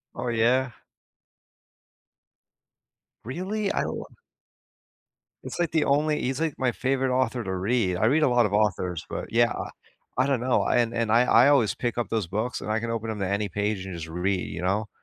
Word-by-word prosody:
Oh, -, -, -3 dB
yeah? 120 Hz, +3 st, +2 dB, 2.5 s
Really? 190 Hz, -, -3 dB
I -, -, 0 dB
w -, -, -4 dB, 1.4 s
It's, -, -, -6 dB
like, 170 Hz, -2 st, +1 dB
the 160 Hz, -2 st, +2 dB
only 150 Hz, +2 st, +2 dB
he's, 130 Hz, +3 st, -2 dB
like, 160 Hz, -3 st, 0 dB
my 130 Hz, -2 st, +1 dB
favorite 130 Hz, 0 st, 0 dB
author 125 Hz, -2 st, 0 dB
to 95 Hz, -1 st, -3 dB
read. 95 Hz, 0 st, 0 dB
I 105 Hz, -, +2 dB
read 150 Hz, +7 st, +3 dB
a -, -, +4 dB
lot 120 Hz, -2 st, +3 dB
of 100 Hz, -, -5 dB
authors, 95 Hz, -5 st, 0 dB
but, -, -, -4 dB
yeah, -, -, +4 dB
I -, -, -5 dB, 0.5 s
I 130 Hz, -, +3 dB
don't 135 Hz, -4 st, +1 dB
know, 125 Hz, +1 st, +2 dB
I -, -, +2 dB
and 120 Hz, -1 st, +1 dB
and 115 Hz, -2 st, 0 dB
I 115 Hz, +2 st, +6 dB
I 120 Hz, +2 st, +6 dB
always 135 Hz, -7 st, +3 dB
pick 120 Hz, -1 st, -2 dB
up 120 Hz, -, -1 dB
those 110 Hz, -5 st, -1 dB
books, 110 Hz, +8 st, -3 dB
and -, -, -7 dB
I 110 Hz, -, 0 dB
can 115 Hz, +1 st, -3 dB
open 115 Hz, -1 st, -3 dB
'em 110 Hz, -2 st, -4 dB
to 95 Hz, -, -1 dB
any 100 Hz, +1 st, -1 dB
page 100 Hz, +1 st, -2 dB
and 95 Hz, -, -6 dB
just 80 Hz, -1 st, -6 dB
read, 90 Hz, +3 st, -1 dB
you 80 Hz, -, -5 dB
know? 100 Hz, +4 st, 0 dB
115 Hz, 205 wpm, -26 LUFS, 100-130 Hz, 2.5 s, I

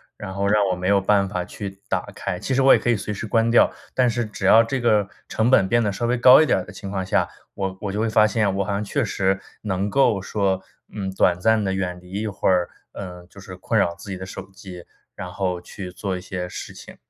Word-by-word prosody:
然 95 Hz, -2 st, -7 dB
后 100 Hz, +1 st, -1 dB
让 105 Hz, 0 st, +3 dB
我 90 Hz, -, -1 dB
没 90 Hz, +1 st, -3 dB
有 100 Hz, 0 st, +4 dB
办 100 Hz, 0 st, +2 dB
法 90 Hz, -2 st, -3 dB
去 95 Hz, +1 st, -8 dB
打 -, -, -1 dB
开， 90 Hz, -, -4 dB
其 130 Hz, -, -2 dB
实 135 Hz, -, +3 dB
我 135 Hz, -, +7 dB
也 -, -, +4 dB
可 -, -, -1 dB
以 120 Hz, -, +4 dB
随 105 Hz, +1 st, -4 dB
时 105 Hz, +2 st, -5 dB
关 115 Hz, +1 st, +2 dB
掉。 120 Hz, -, +6 dB, 0.2 s
但 125 Hz, -2 st, +3 dB
是 120 Hz, +1 st, -1 dB
只 105 Hz, -2 st, -6 dB
要 115 Hz, +4 st, +7 dB
这 130 Hz, +4 st, -2 dB
个 105 Hz, -4 st, +2 dB, 0.2 s
成 110 Hz, +3 st, +1 dB
本 95 Hz, -7 st, +5 dB
变 120 Hz, +2 st, +2 dB
得 105 Hz, -, 0 dB
稍 100 Hz, +4 st, -3 dB
微 125 Hz, +1 st, +1 dB
高 125 Hz, +4 st, +8 dB
一 -, -, +4 dB
点 -, -, +2 dB
儿 -, -, -4 dB
的 90 Hz, -, -11 dB
情 95 Hz, +1 st, -8 dB
况 95 Hz, -1 st, -3 dB
下， 95 Hz, -, +1 dB, 0.3 s
我 95 Hz, -1 st, -4 dB
我 100 Hz, -, -3 dB
就 105 Hz, -, -3 dB
会 110 Hz, 0 st, +1 dB
发 110 Hz, 0 st, +5 dB
现 105 Hz, -2 st, +1 dB
我 100 Hz, -, +1 dB
好 100 Hz, -, -4 dB
像 100 Hz, -, -1 dB
确 135 Hz, +7 st, -1 dB
实 95 Hz, -2 st, 0 dB, 0.3 s
能 100 Hz, -1 st, -1 dB
够 110 Hz, -6 st, +3 dB
说， 95 Hz, -1 st, -1 dB, 0.3 s
嗯， 95 Hz, -3 st, -4 dB
短 90 Hz, -2 st, +2 dB
暂 110 Hz, +3 st, +2 dB
地 95 Hz, -, 0 dB
远 90 Hz, -2 st, -3 dB
离 90 Hz, -, -16 dB
一 110 Hz, -, -2 dB
会 100 Hz, -, -2 dB
儿， 90 Hz, -2 st, +2 dB, 0.2 s
呃， 90 Hz, -2 st, -8 dB
就 100 Hz, +1 st, -14 dB
是 95 Hz, -1 st, -10 dB
困 110 Hz, +5 st, -1 dB
扰 85 Hz, -4 st, +2 dB
自 85 Hz, +4 st, -12 dB
己 95 Hz, -, -3 dB
的 95 Hz, -, -7 dB
手 95 Hz, 0 st, -9 dB
机， 90 Hz, -3 st, -11 dB, 0.3 s
然 90 Hz, -, -6 dB
后 90 Hz, -3 st, -2 dB
去 90 Hz, +1 st, -9 dB
做 95 Hz, 0 st, -4 dB
一 90 Hz, -, -8 dB
些 90 Hz, -1 st, -5 dB
事 90 Hz, -, -8 dB
情， -, -, -12 dB
100 Hz, 290 characters per minute, -23 LUFS, 95-110 Hz, 0.3 s, 高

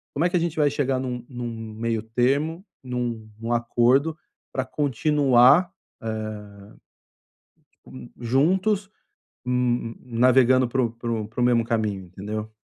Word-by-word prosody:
Como 155 Hz, +4 st, +1 dB
é -, -, +3 dB
que 180 Hz, -, +1 dB
a -, -, +2 dB
gente 170 Hz, -1 st, -2 dB
vai 150 Hz, -2 st, +4 dB
chegar 135 Hz, -2 st, 0 dB
num 125 Hz, -2 st, -4 dB
num 120 Hz, -2 st, -5 dB, 0.2 s
meio 115 Hz, 0 st, -1 dB
termo, 140 Hz, -, 0 dB, 0.2 s
num 120 Hz, -3 st, -4 dB
num 115 Hz, +1 st, -4 dB
acordo 125 Hz, +6 st, +2 dB, 0.4 s
pra 130 Hz, -, -1 dB
continuar, 145 Hz, +2 st, +4 dB, 0.3 s
eh 110 Hz, -1 st, -4 dB, 1.5 s
hum, 65 Hz, -1 st, -11 dB
juntos, 185 Hz, -, +1 dB, 0.6 s
hum, 125 Hz, -2 st, 0 dB
navegando 130 Hz, +1 st, +4 dB
para 130 Hz, +1 st, +1 dB
o 115 Hz, -, -1 dB
para 115 Hz, 0 st, -5 dB
o 110 Hz, -2 st, -2 dB
para 115 Hz, +3 st, -5 dB
o -, -, +3 dB
mesmo 120 Hz, -1 st, +3 dB
caminho, 105 Hz, -5 st, -1 dB
entendeu? 105 Hz, +4 st, -6 dB
125 Hz, 140 wpm, -24 LUFS, 115-140 Hz, 1.5 s, vai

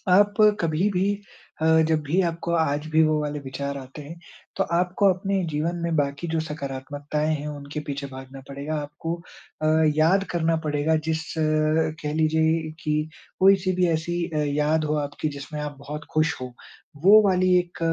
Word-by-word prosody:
आप 205 Hz, +3 st, +5 dB, 0.3 s
कभी-भी 180 Hz, +4 st, +1 dB, 0.6 s
अ, -, -, +3 dB, 0.2 s
जब 160 Hz, -1 st, +2 dB
भी 160 Hz, +7 st, +1 dB
आपको 170 Hz, +1 st, -4 dB
आज 150 Hz, -1 st, 0 dB
भी 160 Hz, +1 st, +5 dB
वो 155 Hz, -1 st, +2 dB
वाले 150 Hz, 0 st, -3 dB
विचार 140 Hz, +1 st, -5 dB
आते 135 Hz, +3 st, -10 dB
हैं, 165 Hz, +4 st, -10 dB, 0.4 s
तो -, -, +2 dB
आपको 180 Hz, +3 st, +2 dB
अपने 195 Hz, +1 st, -1 dB
जीवन 155 Hz, +4 st, -1 dB
में 170 Hz, -1 st, -1 dB
बाकी 140 Hz, +3 st, -1 dB
जो 160 Hz, 0 st, 0 dB
सकारात्मकताएँ 145 Hz, +1 st, -3 dB
हैं 150 Hz, 0 st, -5 dB
उनके 145 Hz, +1 st, -6 dB
पीछे 140 Hz, 0 st, -4 dB
भागना 130 Hz, +1 st, -9 dB
पड़ेगा। 140 Hz, +3 st, -5 dB
आपको 150 Hz, +3 st, -5 dB, 0.5 s
अ, -, -, +2 dB, 0.3 s
याद 180 Hz, +6 st, +4 dB
करना 165 Hz, -1 st, +1 dB
पड़ेगा 150 Hz, +1 st, +1 dB
जिस 160 Hz, 0 st, 0 dB, 0.8 s
कह 150 Hz, 0 st, -2 dB
लीजिए 160 Hz, 0 st, +1 dB
कि 150 Hz, 0 st, -1 dB, 0.5 s
कोई-सी 190 Hz, -1 st, +5 dB
भी 180 Hz, -1 st, +3 dB
ऐसी 170 Hz, +1 st, -1 dB
अ, -, -, +1 dB
याद 150 Hz, +1 st, +1 dB
हो 150 Hz, 0 st, 0 dB
आपकी 145 Hz, +2 st, -3 dB
जिसमें 150 Hz, +2 st, -6 dB
आप 150 Hz, -1 st, -5 dB
बहुत 145 Hz, +1 st, -7 dB
खुश 155 Hz, +1 st, +2 dB
हो। 125 Hz, -1 st, -6 dB, 0.5 s
वो 215 Hz, +3 st, +9 dB
वाली 185 Hz, 0 st, +2 dB
1 175 Hz, 0 st, -4 dB
155 Hz, 165 wpm, -24 LUFS, 145-170 Hz, 0.8 s, वो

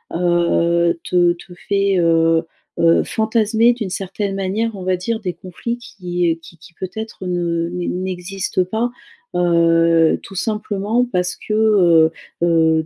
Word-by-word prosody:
heu, 170 Hz, -1 st, +2 dB
te 175 Hz, -1 st, +3 dB
te 175 Hz, +1 st, -14 dB, 0.2 s
fait, 200 Hz, -1 st, +2 dB
heu, 165 Hz, -1 st, +3 dB, 0.4 s
heu, 165 Hz, 0 st, +4 dB
fantasmer 220 Hz, +1 st, +2 dB
d'une 225 Hz, -5 st, -4 dB
certaine 195 Hz, +1 st, -3 dB
manière, 205 Hz, +4 st, -1 dB
on 190 Hz, -, -7 dB
va 185 Hz, 0 st, +1 dB
dire, 220 Hz, +5 st, -2 dB
des 185 Hz, -4 st, -3 dB
conflits 190 Hz, +8 st, -5 dB
qui 175 Hz, -7 st, -2 dB
qui 165 Hz, +1 st, -15 dB
qui 170 Hz, +1 st, -17 dB
peut-être 195 Hz, +3 st, -7 dB
ne 170 Hz, -1 st, -1 dB
n'e 180 Hz, 0 st, -4 dB
n'existent 185 Hz, +1 st, -2 dB
pas, 220 Hz, +6 st, -1 dB, 0.4 s
heu, 165 Hz, -1 st, +3 dB
tout 195 Hz, -, -11 dB
simplement 210 Hz, +3 st, -1 dB
parce 180 Hz, 0 st, 0 dB
que, 215 Hz, -, -5 dB
heu, 180 Hz, -7 st, +4 dB, 0.3 s
heu, 160 Hz, -2 st, +3 dB
180 Hz, 140 wpm, -19 LUFS, 170-205 Hz, 0.4 s, heu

